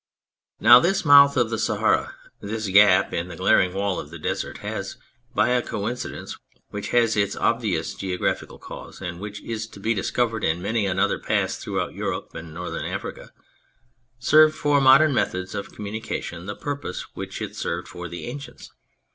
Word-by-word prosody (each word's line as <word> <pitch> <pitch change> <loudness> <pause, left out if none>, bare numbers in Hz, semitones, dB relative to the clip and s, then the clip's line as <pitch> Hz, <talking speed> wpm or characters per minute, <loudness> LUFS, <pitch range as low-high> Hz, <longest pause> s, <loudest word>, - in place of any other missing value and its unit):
Now 120 +2 +9
this 195 +6 +1
Mouth 140 -1 +7
of 120 -2 +2
the 115 - -1
Sahara, - - +1 0.2
this 110 +1 -4
gap 95 -1 +5
in 85 +1 -2
the 90 - -8
glaring 95 0 +3
wall 100 0 -1
of 75 - -8
the 85 - -9
Desert, 75 - -3
has, - - -5 0.4
by - - +3
a 125 0 +2
coincidence 120 +3 -5 0.4
which 105 0 -5
has 115 -2 +3
its 100 -2 +1
obvious 105 -9 0
geographical 90 -2 -3
cause, - - -10
and 90 -2 -6
which 105 +1 -7
is 115 -1 -4
to 100 - -13
be 110 +4 0
discovered 110 +2 -1
in 80 +2 +1
many 105 +2 -1
another 95 +2 +1
pass - - 0
throughout - - -3
Europe - - -4
and 80 0 -8
Northern 90 +2 -5
Africa, - - -6 0.9
served 155 +5 +5
for 145 -1 +2
modern 135 +3 +6
methods 95 -6 -1
of 100 -1 -5
communication 100 -4 -5
the 105 - -4
purpose 145 0 -5
which - - -6
it - - -5
served 85 +1 -3
for 90 0 -7
the 85 - -7
ancients. 140 +4 -9
105 Hz, 170 wpm, -24 LUFS, 95-120 Hz, 0.9 s, Now